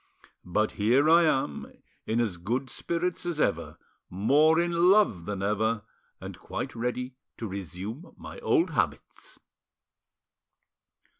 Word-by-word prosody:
But 105 +5 +1
here 125 +8 +2
I 170 0 +6
am, 135 - -1 0.4
in 110 +2 0
as 105 -7 -1
good 120 +9 -3
spirits 170 +1 -2
as 175 -3 -3
ever, - - -1 0.3
more 145 - +3
in 170 0 +1 0.2
love 195 - +3
than 100 -1 -4
ever, 105 +2 0 0.4
and - - -9
quite - - -5
ready 125 +2 -3 0.2
to 115 - -5
resume 100 - -7
my - - -10
old 395 -8 +2
habits." - - -3
120 Hz, 125 wpm, -27 LUFS, 105-160 Hz, 0.4 s, I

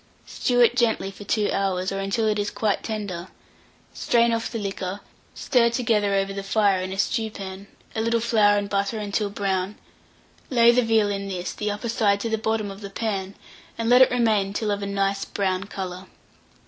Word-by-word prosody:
Stew 245 -1 0
it 240 0 +5
gently 225 -5 +1
for 205 +1 -11
2 210 0 +1
hours, 190 -1 0
or 195 - -3
until 195 +3 0
it 210 -1 +1
is 205 0 -1
quite 210 -3 -1
tender; 200 -5 -4 0.7
strain 235 -1 +2
off 230 0 -2
the 235 - -3
liquor; 195 -1 -4 0.3
stir 235 -3 +3
together 220 -4 +1
over 195 0 0
the 195 - -4
fire, 195 -1 +2
in 185 0 -4
a 190 - -5
stewpan, 200 -2 -3 0.3
a 220 - 0
little 230 +1 +1
flour 215 -3 +3
and 205 0 -1
butter 200 +2 -1
until 205 0 -1
brown; 195 -1 -2 0.7
lay 235 -2 +6
the 250 +1 +3
veal 220 -3 +2
in 200 0 -3
this, 180 -2 -4
the 210 - -3
upper 205 +3 -4
side 210 -3 +2
to 230 - -3
the 220 - 0
bottom 220 -2 -1
of 195 +1 -11
the 200 - -7
pan, 195 -2 -3 0.4
and 230 0 -1
let 250 +1 +7
it 260 - +7
remain 215 -5 +1
till 210 0 -1
of 205 0 -2
a 200 - -3
nice 195 0 0
brown 190 -1 -2
colour. 185 -2 -6
205 Hz, 200 wpm, -24 LUFS, 195-225 Hz, 0.7 s, let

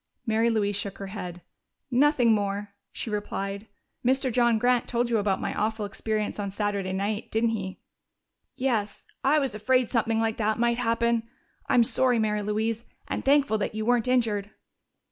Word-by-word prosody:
Mary 225 0 +2
Louise 205 -3 +1
shook 200 -1 -4
her 200 - -6
head. 180 -4 -6 0.5
"Nothing 255 -2 +4
more," 205 -1 -2 0.2
she 225 - -5
replied. 200 0 -3 0.4
"Mr. 260 +1 +2
John 235 -1 +3
Grant 245 +1 +2
told 240 0 0
you 225 - +3
about 200 -2 +1
my - - -2
awful 215 0 -1
experience 215 +1 -2
on 200 -1 -2
Saturday 200 -1 -2
night, 205 +3 -2
didn't 225 +1 +1
he?" 190 -4 -5 0.7
"Yes. 230 -6 -1 0.2
I 280 +3 +4
was 270 -6 0
afraid 250 +3 +1
something 225 -2 +1
like 225 -1 0
that 215 -1 +1
might 235 0 +1
happen. 230 -1 +1 0.4
I'm 240 - +5
sorry, 250 +1 +2
Mary 210 -1 +1
Louise, 220 +2 -1 0.2
and - - -3
thankful 275 -5 +3
that 210 - -2
you 215 0 -2
weren't 245 0 +2
injured." 220 -5 +1
220 Hz, 165 wpm, -27 LUFS, 205-240 Hz, 0.7 s, I'm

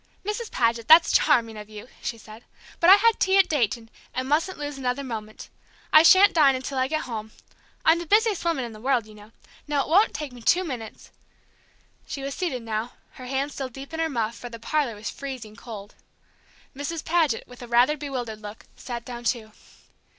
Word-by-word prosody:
"Mrs. 425 +2 -3
Paget, 230 -1 0
that's 330 +2 +7
charming 225 -2 +3
of 210 0 -9
you," 215 +2 -10
she 230 - -4
said. 220 +1 -13 0.4
"But 340 - +5
I 385 - +11
had 455 +2 +3
tea 380 +1 +3
at 390 - +5
Dayton, 230 -5 -1 0.2
and 255 0 -2
mustn't 320 +6 0
lose 290 -1 -5
another 255 +1 -2
moment. 220 -4 -7 0.5
I 310 - +10
shan't 380 +4 +7
dine 285 -5 +5
until 260 +1 -4
I 260 - +2
get 310 +2 -1
home. 220 -3 -6 0.5
I'm 325 +1 +5
the 345 - -7
busiest 425 +1 +3
woman 330 -7 0
in 235 - -8
the 215 - -12
world, 255 -3 +1
you 215 - -14
know. 210 +1 -15 0.4
Now, 290 -2 +1
it - - -9
won't 390 +7 +4
take 290 -3 -5
me 245 - -12
two 360 +10 +3
minutes 245 -9 -7 0.5
" - - -36
She 275 - -6
was 275 0 -4
seated 275 -10 -3
now, 225 +1 -3 0.2
her 255 - -11
hands 275 +3 -2
still 270 -2 -5
deep 270 +4 -11
in 320 - -4
her 325 0 0
muff, 230 -4 -2
for 245 - -8
the 230 - -8
parlor 240 +1 -1
was 210 +2 -6
freezing 255 -6 -8
cold. 210 -2 -10 0.8
Mrs. 290 +4 -5
Paget, 320 -8 +1
with 245 -1 -14
a 245 - -8
rather 245 +5 +4
bewildered 250 -7 -5
look, 210 +1 -10
sat 235 -2 -7
down, 240 -1 -7
too. 230 -2 -2
260 Hz, 210 wpm, -25 LUFS, 230-310 Hz, 0.8 s, I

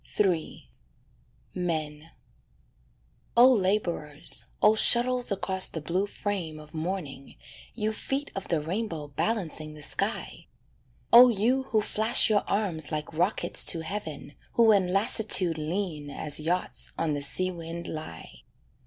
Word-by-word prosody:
III 180 - -1 0.9
=Men= 160 -3 -4 1.3
Oh 250 +2 +7
labourers, 185 -8 0
oh 210 - +4
shuttles 245 +2 +4
across 190 -1 +2
the 160 - -6
blue 180 +6 -2
frame 185 -7 -5
of 150 0 -15
morning, 155 -5 -6 0.4
You 215 -1 -2
feet 275 +6 -4
of 195 - -6
the 165 - -1
rainbow 165 -3 -5
balancing 155 -3 -3
the 150 - -9
sky! - - -3 0.7
Oh 245 +1 +9
you 240 +5 0
who 215 -4 0
flash 220 +2 +3
your 205 - +3
arms 180 -7 -1
like 150 0 -5
rockets 175 +6 +1
to 165 - +4
heaven, 160 -5 -7 0.2
Who 230 -1 +4
in 190 -4 +1
lassitude 195 -5 +4
lean 155 -2 -4
as 145 +1 0
yachts 170 +4 -2
on 165 -2 -1
the 145 - -4
sea 185 +6 +1
wind 170 0 -8
lie! 155 - -9
180 Hz, 130 wpm, -26 LUFS, 155-210 Hz, 1.3 s, Oh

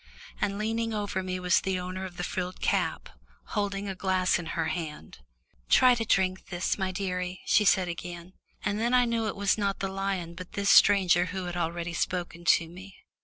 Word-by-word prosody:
And 200 0 0
leaning 225 +1 -1
over 205 -2 -2
me 185 0 -3
was 180 -1 +3
the 190 -1 -1
owner 185 +1 -5
of 180 -1 -9
the 175 - -3
frilled 180 +1 -4
cap, - - 0 0.5
holding 200 -1 -1
a 195 - -3
glass 185 -1 +1
in 170 - -6
her 165 -1 0
hand. 150 - -6 0.5
"Try 255 -1 +6
to 235 -2 -1
drink 190 -4 +1
this, 180 0 -1
my 190 -2 -2
dearie," 180 -1 -3
she 210 - +4
said 190 -2 +4
again, 175 +1 -7 0.3
and 210 +1 0
then 240 +3 +2
I 250 0 +5
knew 230 -2 0
it - - -3
was 200 +1 +1
not 200 -1 0
the 195 - -2
lion 190 -3 -3
but 180 +1 -10
this 200 0 +2
stranger 185 -3 +6
who 190 0 -4
had 175 0 -5
already 170 0 -2
spoken 175 -1 -3
to 165 -1 +4
me. 185 +3 -12
185 Hz, 200 wpm, -28 LUFS, 175-200 Hz, 0.5 s, Try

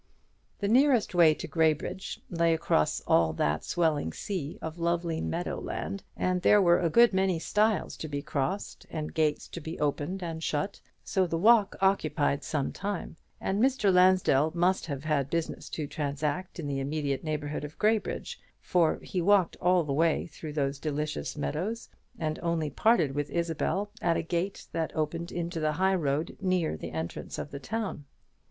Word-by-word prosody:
The 200 - +1
nearest 250 -1 +4
way 165 -3 +6
to - - -6
Graybridge 160 +4 0
lay 170 -1 +3
across 160 - +1
all 80 -1 +3
that 75 0 0
swelling 155 - 0
sea 170 -7 -4
of 160 +1 -6
lovely 170 -1 0
meadow 175 +2 -2
land, 195 0 -4
and 185 0 0
there 210 - +6
were 175 -3 +5
a 170 - +1
good 235 +6 +6
many 190 -2 +2
stiles 210 +5 +1
to 155 - -5
be 145 -1 -4
crossed 155 +8 -3
and 155 -2 -4
gates 155 -2 0
to 170 - -7
be 160 +2 -6
opened 150 +6 -1
and 165 -2 -4
shut, 150 +7 -2 0.2
so 190 -2 +1
the 165 - -1
walk 210 +2 +5
occupied 155 -7 +2
some 140 0 -1
time; 200 -4 -4 0.2
and 195 +2 -1
Mr. 255 -7 +3
Lansdell 180 -5 +5
must 180 +1 +2
have 140 -3 -4
had 145 -3 0
business 165 0 -3
to 155 - -3
transact 150 +5 -3
in 160 - -4
the 140 -1 -2
immediate 140 0 -2
neighbourhood 150 -2 -3
of 150 +1 -8
Graybridge, 215 0 0 0.2
for 170 -3 +2
he 180 - -2
walked 195 0 +4
all 180 0 +4
the 145 -3 -2
way 160 +2 +2
through 155 -2 -8
those 140 -2 -1
delicious 150 +1 -3
meadows, 180 +10 -3 0.3
and 155 -1 -2
only 165 -3 -1
parted 165 - +3
with 145 +1 -2
Isabel 170 +4 -1
at 170 -1 +2
a - - -1
gate 170 +4 -2
that 160 -1 -2
opened 165 +2 -2
into 170 -1 -3
the 155 -1 +1
high 190 +4 +2
road 150 -3 -1
near 185 - +1
the 80 - -6
entrance 80 +1 -5
of - - -5
the 140 - -6
town. 195 -1 -4
165 Hz, 175 wpm, -29 LUFS, 150-185 Hz, 0.3 s, way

